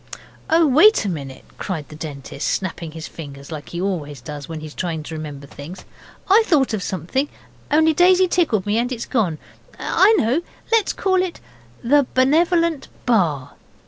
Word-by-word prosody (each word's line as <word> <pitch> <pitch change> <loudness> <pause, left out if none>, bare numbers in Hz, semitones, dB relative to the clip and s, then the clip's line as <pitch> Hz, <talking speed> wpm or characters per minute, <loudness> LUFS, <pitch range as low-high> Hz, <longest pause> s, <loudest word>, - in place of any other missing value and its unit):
'Oh, 325 0 +5
wait 310 - +5
a - - 0
minute,' 140 -6 -6
cried 160 -7 -4
the 150 - -10
Dentist, 145 -2 -6
snapping 170 -4 -3
his 160 0 -7
fingers 140 -2 -10
like 155 -2 -7
he 170 - -5
always 160 -7 -3
does 145 +4 -8
when 160 -1 -5
he 155 - -8
is 150 - -9
trying 165 -4 -3
to 160 - -8
remember 150 -3 -7
things. 145 +6 -10 0.4
'I 400 +4 +6
thought 275 - +3
of 215 - -1
something, 195 - -2 0.4
only 315 +2 +4
Daisy 365 +3 +5
tickled 305 - +1
me 210 +2 +1
and 245 +2 -1
it's 240 -2 -4
gone 200 - 0 0.4
I 395 +3 +4
know 250 - +2 0.3
let's 450 -3 +3
call 375 -1 +1
it 370 -2 -4 0.4
the 280 +2 +4
Benevolent 330 +3 +2 0.2
Bar! 165 - +1
200 Hz, 175 wpm, -21 LUFS, -, 0.4 s, I